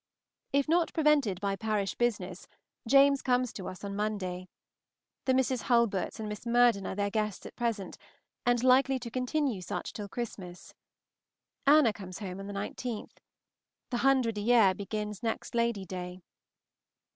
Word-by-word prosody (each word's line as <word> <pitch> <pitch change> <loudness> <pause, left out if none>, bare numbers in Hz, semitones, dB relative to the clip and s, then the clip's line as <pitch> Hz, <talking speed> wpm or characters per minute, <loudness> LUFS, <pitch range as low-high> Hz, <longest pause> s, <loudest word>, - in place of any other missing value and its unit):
If 280 +1 +2
not 335 +1 +2
prevented 295 - +3
by 200 -1 -1
parish 210 -1 -1
business, 195 -7 -2 0.4
James 275 +2 +5
comes 250 -2 +1
to 190 - -6
us 185 - -8
on 200 0 -4
Monday. 190 -4 -3 0.8
The 260 - +3
Mrs. 260 -2 +1
Hulberts 235 -5 +2
and 220 - -4
Miss 210 -1 -6
Murden 235 -4 +3
are - - -4
their 200 0 -1
guests 215 -2 -2
at - - -9
present, 230 -6 -3 0.4
and 245 0 +2
likely 265 +1 +5
to 240 -2 -7
continue 255 -3 -1
such - - -5
till 205 -2 -6
Christmas. 190 -6 -7 0.9
Anna 285 -6 +6
comes 185 -3 -8
home 190 -2 -6
on 195 - -7
the - - -5
19th. 210 +3 -5 0.7
The 245 - 0
hundred 245 -4 +2
a - - -3
year 220 -3 +5
begins 210 +1 -5
next 225 -1 -3
Lady 235 -4 0
day. 180 0 -7
220 Hz, 155 wpm, -30 LUFS, 195-250 Hz, 0.9 s, Anna